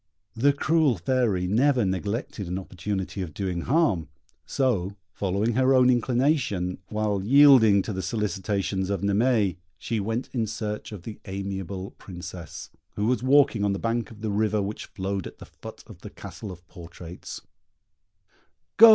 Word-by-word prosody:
The 135 +5 +4
cruel 150 -3 +2
Fairy 100 -1 +1
never 120 +5 +3
neglected 100 +2 -3
an 90 +2 -2
opportunity 95 +1 -4
of 80 -5 -6
doing 90 -3 -2
harm; 115 - +1 0.4
so, 105 -8 0 0.2
following 100 +4 0
her 130 +2 +4
own 125 0 +6
inclination, 120 - +1
while 105 -2 -1
yielding 120 -5 +7
to 110 - -4
the 95 - -3
solicitations 100 -1 -1
of 100 -3 -1
Naimée, 100 -1 +2 0.2
she 110 +6 -2
went 115 +5 -2
in 115 -4 0
search 105 0 -4
of 100 -5 -8
the 110 - -8
amiable 95 -1 -5
Princess, 90 -3 -8 0.2
who 105 - -1
was 125 +2 +1
walking 130 -5 +4
on 100 -1 +2
the - - -2
bank 115 +2 -1
of 110 -2 -13
the 110 -2 -2
river 105 +1 +1
which 100 +2 -4
flowed 95 -1 -3
at - - -12
the - - -11
foot - - -11
of - - -13
the - - -9
Castle 105 - -9
of 90 -1 -12
Portraits: 85 0 -9 1.4
"Go!" 230 +1 +11
105 Hz, 160 wpm, -26 LUFS, 95-120 Hz, 1.4 s, Go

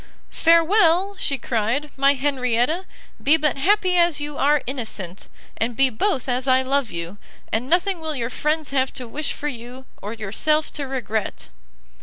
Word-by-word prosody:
"Farewell," 340 +3 +4
she 280 -7 0
cried, 245 +6 -1
"my 275 +1 +4
Henrietta, 270 +4 0 0.3
be 305 +3 +4
but 300 -3 0
happy 370 +2 +3
as 340 -3 +3
you 295 0 -5
are 290 +1 +2
innocent, 215 -8 -5 0.3
and 230 +1 -1
be 270 +1 +3
both 275 - -1
as 255 +1 -1
I 260 0 +4
love 270 -2 0
you, 170 +4 -6 0.3
and 235 +4 -1
nothing 365 +1 +2
will 315 -1 -3
your 240 -2 -3
friends 305 +1 -1
have 265 -1 +1
to 255 -3 -6
wish 295 +6 -3
for 295 - -4
you, 250 0 -7 0.2
or 210 +2 -5
yourself 230 +9 0
to 285 -2 -3
regret." 225 - -3
275 Hz, 165 wpm, -22 LUFS, 245-315 Hz, 0.3 s, Farewell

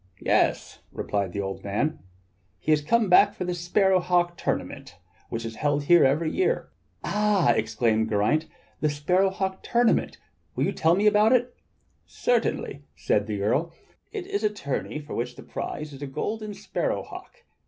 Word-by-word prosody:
^ - - -38
" - - -33
"Yes," - - +1
replied 100 -3 -2
the 100 - -3
old 95 0 -5
man. 110 +11 -1 0.6
"He 155 - -1
has 150 -1 +4
come 225 +8 +2 0.3
for 190 - -4
the 180 - -1
sparrow 185 +2 +2
hawk 175 -1 +1
tournament 90 - -4 0.3
which 115 0 -4
is 115 -1 -6
held 145 0 0
here 175 +3 +6
every 150 +4 +2
year." 415 +6 0 0.3
"Ah!" 210 -8 +2
exclaimed 110 0 +1
Geraint, 110 +10 +1 0.3
"the 155 - +1
sparrow 180 +7 +2
hawk 190 0 -3
tournament, 240 -1 +1 0.4
will - - 0
you - - 0
tell 165 +2 +2
me 200 +3 +1
about 210 +2 +5
that?" 245 0 +2 0.5
"Certainly," 230 - -1
said 105 0 0
the 105 -2 -3
Earl." 150 +11 0 0.4
It 410 -4 -5
is 400 +1 -3
a 215 - +3
tourney 150 -7 -4
for 150 -1 -8
which 125 +1 -3
the 135 - -11
prize 150 -1 -6
is 135 - -11
a 145 - -4
golden 210 +9 -4
sparrow - - -2
hawk. 485 - -12
160 Hz, 175 wpm, -26 LUFS, -, 0.6 s, here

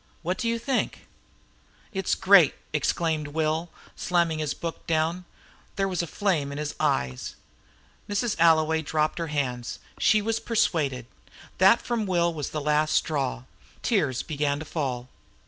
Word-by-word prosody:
What 180 +3 -2
do 235 - -1
you 230 0 +1
think 245 +3 0
of - - -19 0.9
it?" 195 - -3
"It's 190 - +1
great!" 190 -6 +6 0.2
exclaimed 155 0 0
Will, 160 +2 -1 0.3
slamming 170 -3 +1
down - - -1
his 150 -3 -1
book. 165 -1 -6 0.9
There 195 0 +1
was 185 -3 -1
a 170 - -4
flame 160 -7 0
in 140 - -5
his 150 0 -3
eyes. 65 -1 -1 0.7
Mrs. 205 +2 0
Alloway 160 -1 +4
dropped 155 +1 0
her 165 - -2
hands. 125 -5 -2 0.2
She 215 - +4
was 225 +2 -1
persuaded. 150 - 0 0.5
That 195 +5 +6
from 230 -4 -1
Will 170 -2 +2
was 150 -3 -4
the 155 - -4
last 150 +1 +2
straw. 135 - 0 0.4
Tears 130 -2 +1
began 145 -2 -1
to 155 - -6
fall. 130 -6 -3
160 Hz, 155 wpm, -26 LUFS, 145-185 Hz, 0.9 s, great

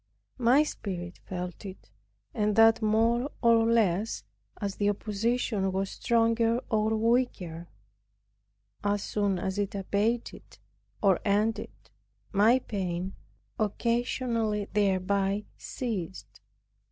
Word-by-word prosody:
My 250 +5 +5
spirit 180 - -6
felt 180 0 -5
it, 190 - -10 0.4
and 210 -1 0
that 225 +1 +6
more 230 +4 +2
or 230 -1 +5
less, 215 -2 +1 0.4
as 200 -1 -3
the 205 0 +2
opposition 210 -1 -1
was 190 +1 -2
stronger 230 0 +2
or 220 0 +2
weaker; 215 -8 0 1.2
as 205 -1 0
soon 200 -3 0
as 190 +2 -3
it 205 0 -2
abated 205 +4 -2 0.5
or 195 -3 +4
ended, 210 +2 +1 0.6
my 220 +4 +5
pain, 190 -6 -3 0.5
occasioned 230 -1 0
thereby, 200 0 +1
ceased. 180 - -5
210 Hz, 100 wpm, -28 LUFS, 195-230 Hz, 1.2 s, that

